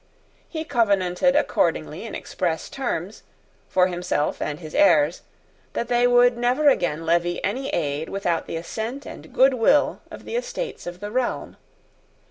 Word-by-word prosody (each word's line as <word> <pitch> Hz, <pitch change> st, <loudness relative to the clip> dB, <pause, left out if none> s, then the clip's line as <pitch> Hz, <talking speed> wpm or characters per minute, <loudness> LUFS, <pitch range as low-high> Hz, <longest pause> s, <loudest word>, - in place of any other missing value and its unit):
He 315 Hz, -2 st, -4 dB
covenanted 225 Hz, -, +2 dB
accordingly 295 Hz, -, 0 dB
in -, -, -6 dB
express 170 Hz, -4 st, -3 dB
terms, 215 Hz, -7 st, -3 dB, 0.5 s
for 180 Hz, -1 st, +4 dB
himself 175 Hz, -4 st, -1 dB
and 150 Hz, +1 st, -3 dB
his 155 Hz, -3 st, -9 dB
heirs, 165 Hz, -5 st, +4 dB, 0.5 s
that 235 Hz, -, -3 dB
they 245 Hz, 0 st, +4 dB
would 245 Hz, 0 st, +4 dB
never 255 Hz, +5 st, +4 dB
again 165 Hz, -, 0 dB
levy 170 Hz, +1 st, +1 dB
any 260 Hz, +7 st, -2 dB
aid 150 Hz, -1 st, -2 dB
without 175 Hz, -4 st, -1 dB
the -, -, -4 dB
assent 225 Hz, +10 st, -5 dB
and -, -, -10 dB
goodwill 265 Hz, +1 st, +3 dB
of -, -, -11 dB
the -, -, -5 dB
Estates -, -, -4 dB
of 175 Hz, +1 st, -7 dB
the 205 Hz, 0 st, -5 dB
realm. 250 Hz, +1 st, -2 dB
200 Hz, 145 wpm, -23 LUFS, 175-255 Hz, 0.5 s, for